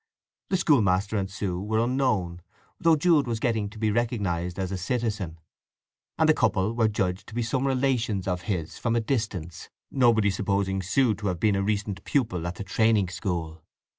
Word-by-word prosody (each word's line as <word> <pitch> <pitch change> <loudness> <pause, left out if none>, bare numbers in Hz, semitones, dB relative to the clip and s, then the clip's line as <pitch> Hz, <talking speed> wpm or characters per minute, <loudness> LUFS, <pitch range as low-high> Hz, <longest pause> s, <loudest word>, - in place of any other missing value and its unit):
The 190 - +2
schoolmaster 105 - +2
and 95 -2 -1
Sue 95 -2 -3
were 110 +2 -1
unknown, 115 -8 0 0.4
though 165 -2 +5
Jude 155 -3 +3
was 115 -2 -2
getting 110 -4 0
to 110 - -13
be 110 0 +1
recognized 100 -7 -1
as 95 -1 -2
a - - -2
citizen; 105 -5 -2 0.8
and - - +3
the - - +6
couple 95 +4 +1
were 115 -1 +2
judged 95 -3 -2
to 110 - -10
be 120 - 0
some 130 +4 0
relations 125 -7 0
of 90 -1 -1
his 85 -5 -3
from 115 -1 0
a - - +3
distance, 110 - -3 0.2
nobody 115 -6 +3
supposing 100 0 0
Sue 110 +5 +2
to 105 0 -4
have 90 -3 -1
been 105 +2 +2
a 100 - +1
recent 100 -1 -2
pupil 90 - 0
at 90 - -4
the 100 - -6
training 105 0 +2
school. 85 -4 -4
105 Hz, 185 wpm, -26 LUFS, 95-120 Hz, 0.8 s, the